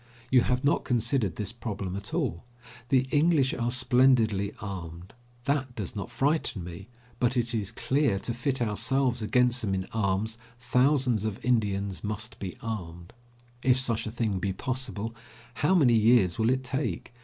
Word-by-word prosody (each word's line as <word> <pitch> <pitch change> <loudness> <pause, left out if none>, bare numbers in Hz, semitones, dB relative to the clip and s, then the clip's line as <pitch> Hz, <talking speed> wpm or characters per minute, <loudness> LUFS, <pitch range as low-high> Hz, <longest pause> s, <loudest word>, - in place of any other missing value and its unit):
You 130 -1 +6
have 125 +1 0
not 140 - +2
considered 115 - 0
this 105 -2 -3
problem 105 -5 -5
at 100 +1 -6
all. 135 - -1 0.5
The 130 -1 +5
English 150 -3 +3
are 120 -1 -1
splendidly 125 -5 +3
armed; 90 -2 -7 0.3
that 135 -3 -1
does 100 -5 -5
not 100 - -4
frighten 140 - 0
me, 90 +3 -9 0.3
but 125 +1 +1
it 120 0 0
is 105 -4 -1
clear 140 -3 +1
that, 95 - -3
to 120 - -2
fit 125 +1 -1
ourselves 120 +3 +1
against 125 +3 +2
them 95 -3 -1
in 95 -1 -2
arms, 110 +1 -1 0.2
thousands 125 -2 +2
of 110 0 -4
Indians 100 -5 0
must 110 +1 -3
be 95 +5 -6
armed. 90 -6 -6 0.5
If 130 0 +4
such 120 -4 0
a - - -4
thing 110 -4 -1
be 95 +1 -1
possible, 115 -1 -3 0.4
how 150 +9 +2
many 135 -9 +5
years 110 -5 +4
will 110 +1 +3
it 130 +1 +1
take. 125 - -3
115 Hz, 165 wpm, -28 LUFS, 100-130 Hz, 0.5 s, You